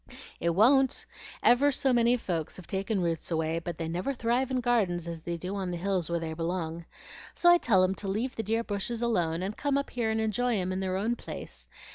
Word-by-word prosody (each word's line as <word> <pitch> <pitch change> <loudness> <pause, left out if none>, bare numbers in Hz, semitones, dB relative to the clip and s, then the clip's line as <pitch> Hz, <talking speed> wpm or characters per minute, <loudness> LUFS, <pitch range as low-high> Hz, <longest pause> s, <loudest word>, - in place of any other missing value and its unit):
"It 170 -1 0
won't! 265 +6 +4 0.4
ever 275 +4 +5
so 270 -1 +1
many 240 +1 +4
folks 165 -8 -3
have 185 - -10
taken 195 0 -1
roots 165 -2 -2
away, 160 0 0
but 170 -1 -6
they 165 - -3
never 180 +12 -2
thrive 240 +2 0
in 260 -1 0
gardens 205 -9 +1
as 165 -1 -5
they 170 +1 -4
do 180 +4 -5
on 190 -2 -3
the 175 - -3
hills 185 -2 -1
where 170 - 0
they 160 -1 -4
belong. 165 0 -3 0.5
So 345 - +6
I 350 - +6
tell 190 - +4
'em 185 +1 +2
to 195 - -6
leave 225 +7 -2
the - - -2
dear 225 +2 0
bushes 225 +3 -3
alone, 175 -7 0
and 200 +3 -3
come 285 -1 0
up 280 - -3
here 235 -3 -1
and 220 0 0
enjoy 220 +2 +1
'em 185 -1 -1
in 185 - -2
their 190 -1 -1
own 225 +5 0
place. - - -8
195 Hz, 230 wpm, -29 LUFS, 170-240 Hz, 0.5 s, So